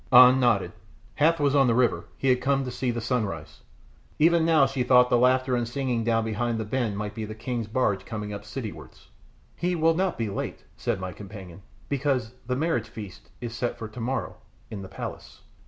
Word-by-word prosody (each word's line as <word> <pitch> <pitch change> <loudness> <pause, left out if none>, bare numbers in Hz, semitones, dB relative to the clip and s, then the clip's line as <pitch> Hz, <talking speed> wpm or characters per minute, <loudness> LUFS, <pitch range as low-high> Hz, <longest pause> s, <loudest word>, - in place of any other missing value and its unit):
An 125 +1 +9
nodded. 110 -8 +2 0.5
Hath 165 +2 +4
was 140 -1 +2
on 135 -2 +5
the 115 - +3
river, 125 -2 +2
he 135 - +1
had 125 -1 +3
been 135 0 +2
to 125 - -4
see 125 +1 -2
the 120 0 -1
sunrise; 90 - -3 0.6
even 165 +1 +4
now 160 -4 +5
she 135 -1 -2
thought 125 0 +5
the - - +5
laughter 130 +1 +3
and 120 -1 -1
singing 125 -2 -1
down 115 -1 +1
behind 115 +1 -1
the 110 - -2
bend 110 -2 -1
might 105 0 -4
be 110 - -5
the 110 0 -6
king's 115 0 -3
barge 110 -4 0
coming 105 -2 -5
up 100 - -5
citywards. 110 +1 -8 0.5
"He 180 +1 -1
will 165 0 +3
not 185 +2 0
be 115 - -1
late," 100 - -4
said - - -2
my 95 0 -4
companion, 95 -1 -10 0.3
"because 135 -5 0 0.2
the 125 - 0
marriage 135 -6 0
feast 105 -5 -10
is 120 -2 -5
set 120 0 -2
for 110 - -6
tomorrow 120 +4 -3 0.3
in 105 -3 -5
the 95 - -9
palace." - - -8
120 Hz, 205 wpm, -26 LUFS, 110-135 Hz, 0.6 s, An